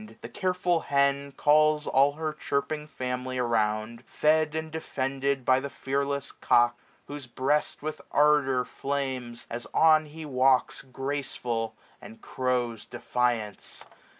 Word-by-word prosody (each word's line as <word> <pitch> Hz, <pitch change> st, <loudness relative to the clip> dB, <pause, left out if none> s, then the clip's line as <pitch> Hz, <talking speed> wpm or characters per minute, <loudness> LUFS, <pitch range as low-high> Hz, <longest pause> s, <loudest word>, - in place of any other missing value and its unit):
The -, -, -6 dB
careful 180 Hz, -2 st, 0 dB
hen 140 Hz, -1 st, +1 dB
Calls 150 Hz, +1 st, +3 dB
all 140 Hz, +2 st, +4 dB
her. 155 Hz, 0 st, -3 dB
chirping 150 Hz, +1 st, -2 dB
family 130 Hz, -2 st, -4 dB
around, 115 Hz, -1 st, 0 dB
770 -, -, -27 dB, 0.4 s
Fed 150 Hz, -, -11 dB
and 160 Hz, 0 st, -3 dB
defended 135 Hz, -3 st, -2 dB
by 130 Hz, 0 st, +4 dB
the 140 Hz, +1 st, -5 dB
fearless 140 Hz, +1 st, -2 dB
cock 120 Hz, 0 st, +3 dB
j 120 Hz, -, -34 dB, 0.2 s
Whose 145 Hz, -3 st, -8 dB
breast 140 Hz, +5 st, -1 dB
with 155 Hz, 0 st, -4 dB
ardour 145 Hz, -4 st, +3 dB
flames, 130 Hz, -4 st, -4 dB
as 115 Hz, -1 st, -5 dB
on 155 Hz, -1 st, +5 dB
he 155 Hz, +1 st, -9 dB
walks 130 Hz, -2 st, +2 dB
Graceful, 130 Hz, -4 st, -3 dB, 0.3 s
and 225 Hz, +2 st, -12 dB
crows 125 Hz, -, -2 dB
defiance. 120 Hz, -3 st, -2 dB
135 Hz, 130 wpm, -27 LUFS, 125-150 Hz, 0.4 s, on